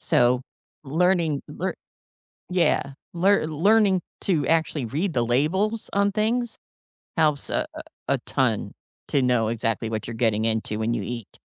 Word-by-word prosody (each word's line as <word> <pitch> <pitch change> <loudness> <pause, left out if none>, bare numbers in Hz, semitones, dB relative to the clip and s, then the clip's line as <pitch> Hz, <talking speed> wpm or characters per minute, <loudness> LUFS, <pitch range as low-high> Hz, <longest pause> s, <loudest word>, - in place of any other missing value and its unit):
So, 125 +1 +3 0.4
learning 165 0 +1
lear - - -3 0.8
Yeah, 170 -6 +1 0.2
lear 190 +1 +3
learning 195 +4 +3 0.2
to 160 -8 +1
actually 160 -4 +1
read 155 - -1
the 120 -3 +1
labels 190 - 0
on 200 0 +2
things 225 +3 0 0.6
helps 150 -3 +2
a - - 0
a - - -7 0.3
a - - +2
ton - - 0 0.4
to 140 - +2
know 125 -3 +2
exactly 115 0 -1
what 110 -2 -3
you're 115 - -5
getting 110 -2 +1
into 110 -1 -1
when 110 +2 0
you 115 - -2
eat. 115 +1 -7
150 Hz, 145 wpm, -24 LUFS, 115-190 Hz, 0.8 s, So